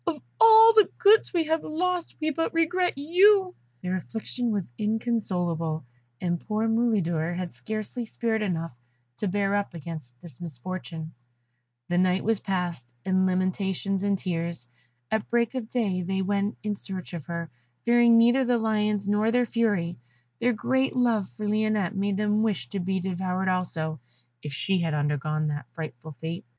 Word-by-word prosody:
Of 320 Hz, -3 st, -1 dB, 0.2 s
all 450 Hz, 0 st, +9 dB
the 430 Hz, -2 st, +6 dB
goods 435 Hz, -1 st, +5 dB
we 340 Hz, -3 st, +1 dB
have 320 Hz, 0 st, 0 dB
lost 355 Hz, +2 st, -2 dB
we 310 Hz, 0 st, 0 dB
but 325 Hz, +2 st, -2 dB
regret 350 Hz, 0 st, +1 dB
you!" 370 Hz, +5 st, +4 dB, 0.3 s
Their 185 Hz, +1 st, -1 dB
affliction 230 Hz, +6 st, -4 dB
was 200 Hz, -, -2 dB
inconsolable, 180 Hz, -, -1 dB, 0.3 s
and 175 Hz, -1 st, -1 dB
poor 215 Hz, +4 st, -1 dB
Mulidor 185 Hz, -8 st, +1 dB
had 180 Hz, -1 st, -4 dB
scarcely 215 Hz, -, -4 dB
spirit 225 Hz, -1 st, -1 dB
enough 165 Hz, -, -2 dB, 0.4 s
to 210 Hz, -, -2 dB
bear 200 Hz, +1 st, +1 dB
up 200 Hz, -3 st, -2 dB
against 155 Hz, -7 st, -8 dB
this 160 Hz, -3 st, -14 dB
misfortune. 165 Hz, +1 st, -6 dB, 0.8 s
The 175 Hz, 0 st, +2 dB
night 185 Hz, 0 st, +2 dB
was 225 Hz, -2 st, +2 dB
passed 175 Hz, -10 st, -3 dB
in 185 Hz, 0 st, +2 dB
lamentations 190 Hz, +1 st, -1 dB
and 200 Hz, 0 st, +1 dB
tears. 170 Hz, -6 st, -3 dB, 0.5 s
At 220 Hz, -1 st, -1 dB
break 235 Hz, 0 st, +1 dB
of 245 Hz, -4 st, -4 dB
day 200 Hz, -7 st, 0 dB
they 190 Hz, +2 st, -1 dB
went 200 Hz, +2 st, -1 dB
in 210 Hz, -1 st, -1 dB
search 190 Hz, -2 st, -7 dB
of 165 Hz, -5 st, -6 dB
her, 170 Hz, -2 st, -5 dB, 0.3 s
fearing 235 Hz, -1 st, +6 dB
neither 240 Hz, +3 st, +5 dB
the 245 Hz, -1 st, +2 dB
lions 210 Hz, -2 st, 0 dB
nor 210 Hz, +2 st, +2 dB
their 245 Hz, +1 st, +3 dB
fury; 205 Hz, -, 0 dB, 0.4 s
their 245 Hz, -, +3 dB
great 260 Hz, +5 st, 0 dB
love 230 Hz, -6 st, +2 dB
for 215 Hz, -1 st, -3 dB
Lionette 215 Hz, -2 st, +1 dB
made 195 Hz, 0 st, 0 dB
them 210 Hz, +1 st, +1 dB
wish 190 Hz, -, -1 dB
to 195 Hz, -, -3 dB
be 190 Hz, +1 st, -1 dB
devoured 185 Hz, +1 st, -1 dB
also, 160 Hz, -4 st, -2 dB, 0.4 s
if 150 Hz, -, -6 dB
she 190 Hz, +6 st, 0 dB
had 165 Hz, -2 st, 0 dB
undergone 150 Hz, +1 st, 0 dB
that 145 Hz, 0 st, -4 dB
frightful 155 Hz, -2 st, -7 dB
fate. 165 Hz, +2 st, -5 dB
195 Hz, 160 wpm, -26 LUFS, 170-230 Hz, 0.8 s, all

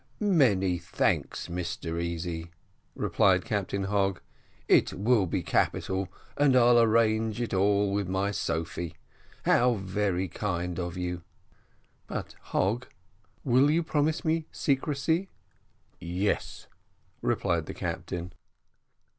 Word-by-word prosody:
"Many 110 Hz, -, +3 dB
thanks, 85 Hz, -, -1 dB
Mr 85 Hz, -1 st, -3 dB
Easy," 85 Hz, 0 st, -4 dB, 0.5 s
replied -, -, +2 dB
Captain 100 Hz, 0 st, -1 dB
Hogg; 95 Hz, -1 st, +1 dB, 0.5 s
"it -, -, +4 dB
will 105 Hz, -1 st, +2 dB
be -, -, -1 dB
capital, 95 Hz, -1 st, 0 dB, 0.2 s
and 140 Hz, -2 st, +4 dB
I'll 120 Hz, -1 st, +6 dB
arrange 110 Hz, 0 st, +2 dB
it 120 Hz, -3 st, -2 dB
all 100 Hz, +1 st, +2 dB
with 100 Hz, -2 st, 0 dB
my 95 Hz, +2 st, 0 dB
Julia. 85 Hz, -2 st, -3 dB, 0.5 s
How 125 Hz, 0 st, +4 dB
very 95 Hz, -1 st, -1 dB
kind 90 Hz, -1 st, -3 dB
of 85 Hz, 0 st, -4 dB
you!" 90 Hz, -1 st, -3 dB, 0.9 s
"But, -, -, -5 dB
Hogg, 115 Hz, +6 st, 0 dB, 0.6 s
will 130 Hz, +2 st, +4 dB
you 165 Hz, +3 st, +2 dB
promise 155 Hz, +2 st, 0 dB
me 160 Hz, 0 st, 0 dB
secrecy?" 150 Hz, +6 st, 0 dB, 0.7 s
"Yes," 90 Hz, +4 st, -2 dB, 0.6 s
replied -, -, 0 dB
the -, -, -6 dB
captain. 90 Hz, 0 st, -4 dB
100 Hz, 110 wpm, -28 LUFS, 90-125 Hz, 0.9 s, I'll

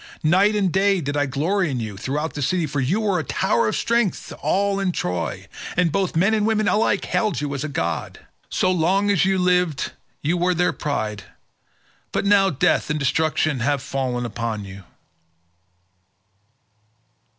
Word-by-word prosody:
Night 190 Hz, +7 st, +4 dB
and 195 Hz, -4 st, +1 dB
day 195 Hz, +1 st, +3 dB
did 145 Hz, -2 st, -3 dB
I 145 Hz, 0 st, +1 dB
glory 165 Hz, +7 st, 0 dB
in 130 Hz, -3 st, -2 dB
you 110 Hz, -3 st, -5 dB
throughout 145 Hz, +10 st, -3 dB
the 145 Hz, -, -5 dB
city, 175 Hz, +5 st, +1 dB
for 145 Hz, -, -3 dB
you 160 Hz, +12 st, +1 dB
were 200 Hz, -4 st, +1 dB
a -, -, -2 dB
tower -, -, +1 dB
of -, -, 0 dB
strength 235 Hz, -4 st, 0 dB
to -, -, -8 dB
all 200 Hz, 0 st, 0 dB
in 195 Hz, -2 st, 0 dB
Troy, 90 Hz, -, -3 dB, 0.3 s
and 175 Hz, -2 st, +3 dB
both 190 Hz, +1 st, -1 dB
men 195 Hz, +7 st, +3 dB
and 215 Hz, -1 st, +2 dB
women 215 Hz, -1 st, +1 dB
alike 210 Hz, -1 st, +2 dB
hailed 210 Hz, -, 0 dB
you 145 Hz, -1 st, -3 dB
as 140 Hz, 0 st, -3 dB
a -, -, -2 dB
god. 85 Hz, -, -3 dB, 0.3 s
So 185 Hz, -, +1 dB
long 190 Hz, +4 st, +2 dB
as 185 Hz, -3 st, +3 dB
you 190 Hz, 0 st, +2 dB
lived 180 Hz, -5 st, +1 dB, 0.3 s
you 165 Hz, +5 st, +1 dB
were 180 Hz, +1 st, +1 dB
their 180 Hz, +1 st, +2 dB
pride, 110 Hz, -9 st, -3 dB, 0.9 s
but -, -, -1 dB
now 200 Hz, -1 st, +5 dB
death 145 Hz, -, +1 dB
and 150 Hz, -, 0 dB
destruction 150 Hz, 0 st, +1 dB
have 140 Hz, +3 st, +1 dB
fallen 130 Hz, -3 st, -2 dB
upon 115 Hz, -2 st, -4 dB
you." 95 Hz, -1 st, -11 dB
160 Hz, 175 wpm, -22 LUFS, 135-195 Hz, 0.9 s, now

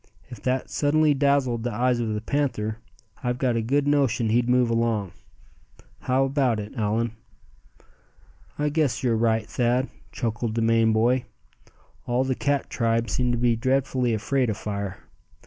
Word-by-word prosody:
If 120 Hz, -5 st, -10 dB
that 130 Hz, 0 st, -1 dB
suddenly 150 Hz, +1 st, +3 dB
dazzled 140 Hz, -4 st, +1 dB
the 120 Hz, +1 st, -2 dB
eyes 120 Hz, +2 st, +1 dB
of 110 Hz, -2 st, -1 dB
the 105 Hz, -, -3 dB
panther, 110 Hz, -5 st, -1 dB, 0.4 s
I've 125 Hz, 0 st, -1 dB
got 125 Hz, -2 st, +1 dB
a 115 Hz, -, +1 dB
good 140 Hz, +5 st, +1 dB
notion 130 Hz, -6 st, +2 dB
he'd 120 Hz, +2 st, +2 dB
move 125 Hz, -1 st, +3 dB
along. 115 Hz, -5 st, 0 dB, 0.9 s
How 130 Hz, +1 st, +1 dB
about 135 Hz, -5 st, +1 dB
it, 105 Hz, 0 st, -7 dB
Allan?" 115 Hz, -1 st, 0 dB, 1.5 s
"I 150 Hz, 0 st, 0 dB
guess 145 Hz, -7 st, 0 dB
you're 120 Hz, -3 st, +2 dB
right, 110 Hz, -1 st, +1 dB
Thad," 125 Hz, +2 st, 0 dB, 0.2 s
chuckled 115 Hz, -2 st, -3 dB
the 115 Hz, -, 0 dB
Maine 115 Hz, 0 st, +3 dB
boy. 120 Hz, +3 st, +2 dB, 0.8 s
"All 120 Hz, +2 st, +1 dB
the 130 Hz, 0 st, 0 dB
cat 140 Hz, +1 st, -1 dB
tribe 115 Hz, -2 st, 0 dB
seem 125 Hz, +2 st, +1 dB
to 120 Hz, -, 0 dB
be 120 Hz, -1 st, +2 dB
dreadfully 130 Hz, -1 st, 0 dB
afraid 125 Hz, +3 st, 0 dB
of 105 Hz, -, -2 dB
fire. 100 Hz, -2 st, -5 dB
120 Hz, 160 wpm, -25 LUFS, 115-130 Hz, 1.5 s, suddenly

